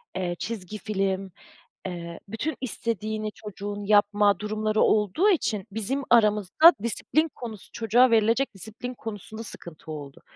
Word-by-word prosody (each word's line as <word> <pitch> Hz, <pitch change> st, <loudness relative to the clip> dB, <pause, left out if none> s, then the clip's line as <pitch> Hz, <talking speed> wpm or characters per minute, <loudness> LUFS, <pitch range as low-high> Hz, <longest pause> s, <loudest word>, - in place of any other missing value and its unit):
eee, 175 Hz, -2 st, -2 dB
çizgi 215 Hz, -2 st, -5 dB
film, 195 Hz, -2 st, -2 dB, 0.6 s
eee, 170 Hz, -2 st, -6 dB
bütün 225 Hz, +9 st, -3 dB
istediğini 215 Hz, -3 st, -3 dB
çocuğun 205 Hz, -1 st, -7 dB
yapma 205 Hz, 0 st, +4 dB
durumları 215 Hz, +1 st, -1 dB
olduğu 215 Hz, -, +3 dB
için 215 Hz, -, 0 dB
bizim 225 Hz, +7 st, -1 dB
aramızda 215 Hz, -, +6 dB
disiplin 310 Hz, +8 st, 0 dB
konusu, 220 Hz, -5 st, -9 dB
çocuğa 235 Hz, +3 st, +4 dB
verilecek 230 Hz, +2 st, +2 dB
disiplin 220 Hz, +6 st, -7 dB
konusunda 220 Hz, -1 st, -7 dB
sıkıntı 170 Hz, -6 st, -9 dB
oldu. 145 Hz, -2 st, -9 dB
215 Hz, 120 wpm, -26 LUFS, 195-230 Hz, 0.6 s, aramızda